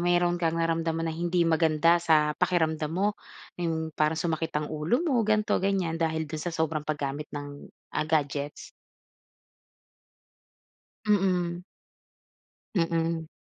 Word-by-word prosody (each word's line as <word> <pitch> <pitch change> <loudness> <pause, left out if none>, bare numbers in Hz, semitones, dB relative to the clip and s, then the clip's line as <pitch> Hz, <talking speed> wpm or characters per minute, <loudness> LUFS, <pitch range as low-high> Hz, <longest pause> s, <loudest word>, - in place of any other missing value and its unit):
mayroon 175 0 +2
kang 165 -1 +1
naramdaman 165 0 0
na 160 - -2
hindi 175 +2 0
maganda 165 0 +4
sa 150 -2 +3
pakiramdam 160 -3 +1
mo 200 +4 0 0.4
iyong 160 -2 -2
parang 155 +1 +2
sumakit 165 -1 -1
ang 150 0 -2
ulo 155 - +1
mo 270 -8 +2
ganito 215 0 +2
ganyan 190 -4 0
dahil 160 -1 0
doon 155 0 -5
sa 175 - -3
sobrang 160 -2 -1
paggamit 150 -1 -3
ng, 145 -1 -7 0.3
ah, - - 0
gadgets? 145 -2 -1 2.4
Mm. 180 -4 +1 1.1
Mm. 165 -2 0
165 Hz, 120 wpm, -28 LUFS, 155-175 Hz, 2.4 s, maganda